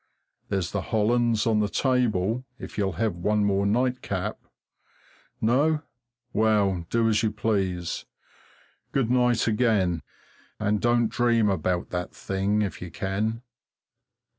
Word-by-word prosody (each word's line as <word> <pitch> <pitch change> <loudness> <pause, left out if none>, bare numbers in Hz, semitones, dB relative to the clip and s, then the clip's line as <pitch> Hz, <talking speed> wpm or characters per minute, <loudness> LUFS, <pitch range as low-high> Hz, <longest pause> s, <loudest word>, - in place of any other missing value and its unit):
There's 95 -4 -1
the 100 - -1
Hollands 115 +2 +1
on 110 -2 +3
the 105 -1 +1
table, 120 -3 +1
if - - -9
you'll 95 -3 0
have 110 +3 0
one 105 +4 +1
more 100 0 +2
nightcap. 110 -4 -1 1.0
No? 145 +7 +2 0.5
Well, 100 -5 +2
do 115 -1 +2
as 110 0 +3
you 110 - +2
please. 95 -5 -1 0.9
Good 125 -4 +1
night 125 -2 +3
again, 105 -7 +2 0.6
and 105 -1 0
don't 120 -1 +3
dream 115 -2 +2
about 90 -1 -1
that 90 -1 -4
thing, 100 +2 0
if 100 - -4
you 90 - -6
can. 105 +6 -2
105 Hz, 125 wpm, -26 LUFS, 95-115 Hz, 1.0 s, on